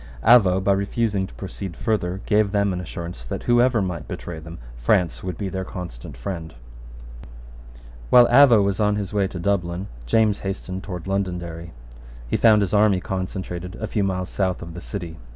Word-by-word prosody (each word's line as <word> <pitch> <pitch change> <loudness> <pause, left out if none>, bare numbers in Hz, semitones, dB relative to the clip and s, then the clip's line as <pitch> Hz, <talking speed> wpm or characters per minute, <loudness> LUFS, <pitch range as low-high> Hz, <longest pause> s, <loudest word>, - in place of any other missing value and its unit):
Avaux, 100 -5 +5
by 100 - +3
refusing 100 0 0
to - - -15
proceed 85 +8 -7
further, 95 -4 -1
gave 105 -2 +2
them 100 -2 +1
an 90 - -3
assurance 85 -6 -7
that, - - -4
whoever 120 -2 +3
might 85 -5 -4
betray 85 -2 -6
them, 80 +2 -10 0.2
France 80 +8 +1
would 90 -3 -4
be 100 - -3
their 95 0 -3
constant 90 -10 -8
friend, 85 -8 -6 1.5
While 125 -1 +8
Avaux 120 -4 +7
was 100 0 -1
on 105 -1 +2
his 100 -1 -4
way 100 -2 +2
to 95 - -8
Dublin, 90 0 -1 0.2
James 105 - +3
hastened 95 -1 -5
towards 90 -5 -6
Londonderry. 90 -4 -3 0.6
He - - -1
found 110 -3 +5
his 95 - -3
army 105 -2 +4
concentrated 95 -1 -5
a 110 - -4
few 105 -1 -1
miles 95 -1 -2
south 95 -3 -1
of 85 -1 -9
the 90 - -8
city. 85 -6 -6
95 Hz, 175 wpm, -23 LUFS, 90-105 Hz, 1.5 s, While